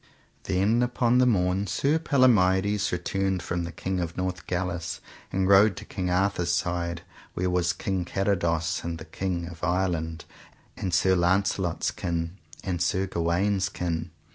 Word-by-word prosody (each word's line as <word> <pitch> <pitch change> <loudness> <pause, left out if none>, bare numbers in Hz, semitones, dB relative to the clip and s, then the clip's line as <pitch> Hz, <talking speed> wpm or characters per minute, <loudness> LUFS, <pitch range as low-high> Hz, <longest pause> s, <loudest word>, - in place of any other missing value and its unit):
Then 100 +5 +2
upon 125 0 +2
the 125 - +5
morn 95 -2 +1
Sir 145 - +1
Palomides 105 - +3
returned 95 +1 -1
from 90 -1 -2
the 85 - -6
King 95 0 -3
of 85 -1 -4
Northgalis, 90 -1 -3 0.3
and 95 0 +1
rode 100 -1 +6
to - - -7
King 90 -3 -3
Arthur's 90 -1 +1
side, 85 -1 -1 0.3
where 90 0 0
was 90 -1 +2
King 95 -2 -2
Carados, 85 -3 0
and 85 -1 -3
the 80 - -9
King 90 -3 -3
of 85 -1 -11
Ireland, 85 -2 -1 0.5
and 95 - -3
Sir 95 +2 +3
Launcelot's 95 0 +1
kin, 85 0 -3 0.3
and 90 -3 -2
Sir 95 +2 +1
Gawaine's 95 +3 0
kin. 85 -3 -3
90 Hz, 145 wpm, -26 LUFS, 85-95 Hz, 0.5 s, rode